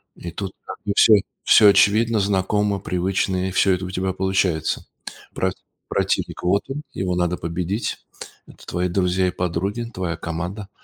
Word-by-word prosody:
и 85 - -7
тут 95 +2 -5
как - - -6
бы 100 - 0
всё, 110 - +7 0.3
всё 105 - +7
очевидно 110 +3 +4
знакомо 100 +1 +1
привычно, 95 0 -1
и - - -6
всё 95 +1 +3
это 90 +1 -2
у 90 - -6
тебя 95 0 -1
получается. 95 -4 0 0.5
Про - - 0 0.4
противник- - - -1
вот 100 +3 +2
он, 145 +3 -4
его 90 -1 -2
надо 90 0 0
победить, 90 +6 -3 0.4
это - - -16
твои 90 +1 -1
друзья 90 0 +1
и - - 0
подруги- 90 +7 -2
твоя 90 -4 -3
команда, 85 +5 -5
95 Hz, 160 wpm, -22 LUFS, 90-100 Hz, 0.5 s, всё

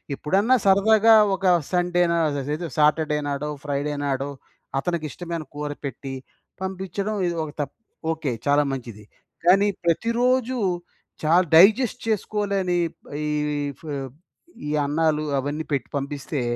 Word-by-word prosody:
ఎప్పుడన్నా, 200 - +2
సరదాగా! 215 +3 +6 0.2
ఒక 190 - -6 0.3
సండేనా, 175 -1 +2
అససేదు 145 +4 -3
సాటర్‌ 155 +1 +3
డే 150 - +2
నాడో, 145 +1 -2
ఫ్రైడే 145 0 -2
నాడో, 135 0 -1 0.5
అతనికి 170 +1 -2
ఇష్టమైన 170 0 -5
కూర 150 0 -3
పెట్టి, 135 0 -6 0.5
పంపించడం 190 +2 -3
ఇది 170 - -2
ఒక 150 - -8
తప్ 140 - -5 0.4
ఓకె. 155 -4 -3 0.2
చాలా 145 +1 +4
మంచిది! 115 -5 -7 0.4
కానీ, 195 +3 +5 0.2
ప్రతిరోజు 245 +7 +1 0.7
చాలా, 170 +4 +4
డైజెస్ట్ 220 +7 +5
చేసుకోలేని 200 -4 0 0.2
ప్ - - -57 0.3
ఈ - - -1 0.3
ఈ - - -1 0.2
ఫ్ - - -14 0.8
ఈ - - -2
అన్నాలు, 155 +1 +1 0.2
అవన్నీ 145 +4 -3
పెట్టి 135 -4 -1
పంపిస్తే, 140 0 -4
165 Hz, 125 wpm, -24 LUFS, 145-195 Hz, 0.8 s, సరదాగా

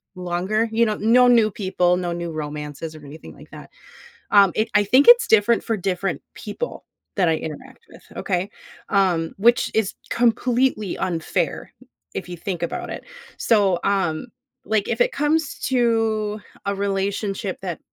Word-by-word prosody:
longer, 185 +5 -1
you 230 +1 +3
know 215 -1 -1
no 245 +3 +5
new 230 -3 +4
people, 185 -3 +1
no 175 -1 -3
new 170 -1 -4
romances 150 +1 -6
or 150 - -12
anything 150 +3 -11
like - - -15
that. - - -12 0.6
Um, 200 -2 +7
it 225 +1 0
I 205 0 +4
think 255 +7 +4
it's 480 0 +8
different 220 +2 +4
for 225 -2 -1
different 190 0 -2
people - - -6 0.3
that 180 -4 +3
I 160 - +2
interact 205 - -8
with, - - -15
okay, 185 0 -2 0.4
um, 180 -5 +1
which 235 +4 +3
is 220 -3 0 0.2
completely 240 -3 +1
unfair, 170 -2 -2 0.4
if 180 - -5
you 175 - -6
think 175 0 -5
about - - -5
it. - - -7 0.3
So, 200 -6 +3
um, 190 0 0 0.4
like, 215 -2 0
if - - -2
it - - +3
comes 295 +1 0
to, 225 -4 +1 0.3
a 200 - 0
relationship 195 0 -2
that, 180 -4 -5
200 Hz, 155 wpm, -22 LUFS, 175-225 Hz, 0.6 s, it's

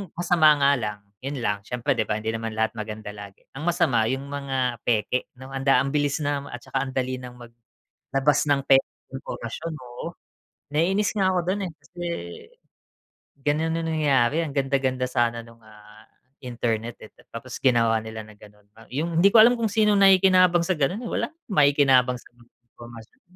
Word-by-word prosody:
masama 170 -3 +4
nga 140 0 +4
lang, 105 -5 -4 0.2
yun 140 0 -4
lang, 105 -1 0
siyempre, 120 +3 -2
'di - - +1
ba, 105 - -1
hindi 110 +1 -2
naman 115 0 -4
lahat 110 0 0
maganda 110 -1 -6
lagi. 100 -1 -12
Ang 140 - -6
masama 120 -8 +2
yung 135 +1 -4
mga 135 -4 -2
peke, 120 +2 -1
'no, 130 - -10
anda 135 -1 +3
ang 135 +2 -1
bilis 145 0 +1
ng 145 -1 -3
at 120 - -6
saka, 135 0 -2
andali 130 -1 -2
nang 125 -1 -11 0.5
maglabas 135 +2 0
ng 140 -1 +2
pekeng 135 0 +1
impormasyon. 155 +6 -6
Oo. 120 +3 -8 0.7
Naiinis 190 +7 +1
nga 195 -2 +2
ako - - +2
do'n 200 +1 -3
eh, - - -11
kasi 165 +4 -15 1.4
gano'n 155 +3 0
ang 165 0 -2
nangyayari. 145 -1 +2
Ang 145 - -7
ganda-ganda 135 -2 0
sana 120 -1 0
no'ng, 115 0 -18
ah, 105 0 -17 0.4
internet 120 -2 -3
eh, 110 - -14 0.2
tapos 120 +2 -7
ginawa 115 -3 +3
nila 110 0 -7
na 110 - -14
gano'n. 105 0 -18 0.3
Yung 165 +4 -1
hindi 200 - +7
ko 225 - +8
alam 235 +3 +7
kung 225 - +1
sinong 210 -1 +3
nakikinabang 185 -2 +5
sa 185 - +1
gano'n 165 +9 0
eh. - - -4
Wala - - -1
ng 320 - -34 0.2
makikinabang 140 -4 +4
sa - - -18
mga 120 0 -22 0.2
impormasyon. 115 -1 -13
135 Hz, 175 wpm, -24 LUFS, 115-155 Hz, 1.4 s, ko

